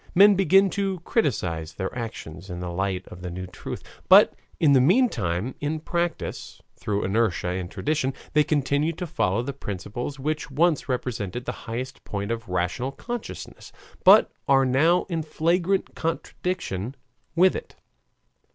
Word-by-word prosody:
Men 200 +3 +8
begin 195 0 +4
to 195 -2 -1
criticise 85 - -1
their 95 -1 -4
actions 100 -7 -7
in 90 -1 -5
the 90 -1 -4
light 95 +1 -2
of 90 - -11
the 90 - -5
new 90 +2 -5
truth, 90 - -7 0.3
but - - +8 0.3
in 150 -4 +5
the 130 - +6
meantime 125 - +2
in 150 +2 -2
practice, 170 +2 -3 0.2
through 105 -1 -2
inertia 100 -3 +1
and 90 0 -3
tradition, 140 +1 -1 0.2
they 150 +1 +5
continue 145 +2 +1
to 180 +3 -5
follow 120 - 0
the 140 +2 -4
principles 120 +4 -5
which 150 +2 -2
once 155 +2 +1
represented 120 -3 -3
the - - -1 0.2
highest 130 +4 -5
point 100 +1 -4
of 115 -3 -4
rational 90 +9 -1
consciousness, 240 - -7 0.3
but - - +7 0.2
are 135 -1 +5
now 155 +8 +3
in 165 -4 -3
flagrant 170 +5 0
contradiction 160 - -3 0.4
with 185 +2 +5
it. - - -7
130 Hz, 150 wpm, -25 LUFS, -, 0.4 s, Men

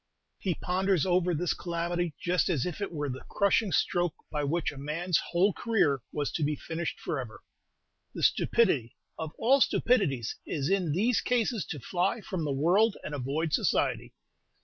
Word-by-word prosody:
He 180 -4 -1
ponders 185 -1 +1
over 180 -1 +2
this 175 +2 0
calamity 170 -1 -2
just 180 +2 +1
as 155 -8 +1
if 180 +3 -5
it 200 - -2
were 150 -3 -3
the 130 -1 -5
crushing 200 0 +2
stroke 175 -2 +1 0.2
by 150 -1 -1
which 160 +3 0
a 145 - -11
man's 165 +5 0
whole 185 +3 +3
career 165 - +1
was 145 -1 -2
to 160 - -2
be 150 +1 +1
finished 165 +2 -4
forever. 125 -7 -5 0.7
The - - -4
stupidity 150 - +2 0.2
of 160 -1 -4
all 265 +4 +4
stupidities 165 - +2
is 145 +1 -2
in 185 -5 +1
these 225 +8 +2
cases 235 -3 0
to 150 - -6
fly 180 - 0
from 185 -5 -3
the 145 - -1
world 180 +10 +3
and 150 - -5
avoid 145 +4 -2
society. - - +1
170 Hz, 170 wpm, -29 LUFS, 150-190 Hz, 0.7 s, all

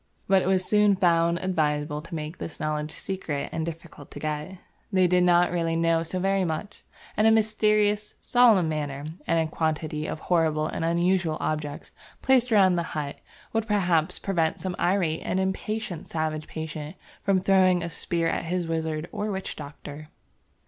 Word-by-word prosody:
But 195 -1 +4
it - - -2
was 190 -1 +2
soon 210 -1 +4
found 170 -2 +3
advisable 150 -4 0
to 165 +1 -8
make 155 +2 -6
this 160 - -7
knowledge 150 0 -2
secret 160 -5 -4
and 160 - -2
difficult 165 -3 -8
to - - -9
get. 155 +4 -4 0.3
They 185 -2 +4
did 180 0 +3
not 175 0 +4
really 165 -2 0
know 165 0 +2
so 165 +3 -3
very 195 +1 +1
much, 180 +5 -4 0.3
and 215 - +4
a - - +6
mysterious, 215 -1 +2
solemn 230 -8 +4
manner 145 -2 -3 0.2
and 165 - +2
a - - -15
quantity 155 -1 -2
of - - -4
horrible 160 -3 +1
and 160 - -3
unusual 170 -1 +1
objects 150 -1 -3 0.3
placed 250 -2 +3
about 190 -4 +5
the - - +1 0.2
hut 145 -2 -4 0.3
would 225 0 0
perhaps 175 -7 +1
prevent 165 -5 0
some 185 -1 -3
irate 175 -4 +1
and 185 - -1
impatient 190 -1 -3
savage 155 -1 -3
patient 155 0 -6 0.3
from 195 -1 +2
throwing 185 -2 +3
a - - -2
spear 170 0 -1
at - - -1
his 175 0 -2
wizard 160 -1 -2
or 210 0 -3
witch 190 -1 -4
doctor. 150 +1 -9
170 Hz, 170 wpm, -26 LUFS, 155-190 Hz, 0.3 s, a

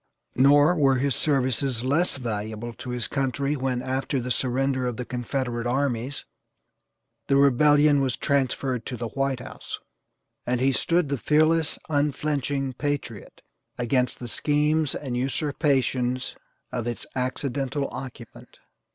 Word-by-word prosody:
Nor 145 +5 +5
were 135 -3 +4
his 135 +1 +1
services 130 -3 +1
less 145 +5 +1
valuable 110 -1 -4
to 125 - -8
his 125 -2 -1
country 140 +1 -1
when, 130 -2 -1
after 130 +1 -1
the 125 +1 -3
surrender 130 +1 0
of 120 - -3
the 125 - -4
Confederate 120 -1 -2
armies, 130 0 -1 1.0
the 140 - +3
rebellion 145 +2 +5
was 130 -3 0
transferred 130 -3 0
to 125 - -4
the 115 0 -4
White 135 -1 -1
House, - - -7 0.7
and 125 0 0
he 135 +2 +3
stood 165 +3 +1
the 140 -2 -1
fearless, 155 +2 +3
unflinching 145 -2 0
patriot 140 -6 -4 0.4
against 125 +1 +1
the 120 - -7
schemes 150 +3 +1
and 130 -4 -4
usurpations 130 -2 0 0.4
of 120 -2 -3
its 120 - -4
accidental 135 +2 -2
occupant. 125 -3 -9
135 Hz, 130 wpm, -25 LUFS, 125-145 Hz, 1.0 s, Nor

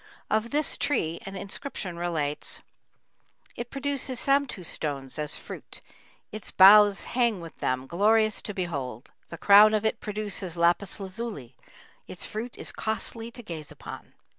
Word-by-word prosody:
Of 220 +2 +1
this 295 +2 +1
tree 165 - 0
an 195 - -6
inscription 195 -1 -5
relates: 160 -4 -2 0.9
It 240 0 -5
produces 275 -2 -3
samtu 275 -9 +1
stones 140 -3 -4
as 150 0 0
fruit; - - -7 0.5
Its 215 -2 -7
boughs 205 +1 +8
hang 235 -5 +1
with 165 -2 -10
them, 130 0 -1
glorious 215 +7 +3
to 210 - -5
behold; 140 - -4 0.2
The 170 - -7
crown 210 +3 +7
of 215 0 0
it 220 - +1
produces 205 -4 -4
lapis 175 +4 +2
lazuli; 190 - -6 0.5
Its 180 - -3
fruit 230 +3 -5
is - - -5
costly 225 +1 -3
to 240 +1 -9
gaze 160 -7 -7
upon. - - -10
200 Hz, 140 wpm, -27 LUFS, 170-225 Hz, 0.9 s, boughs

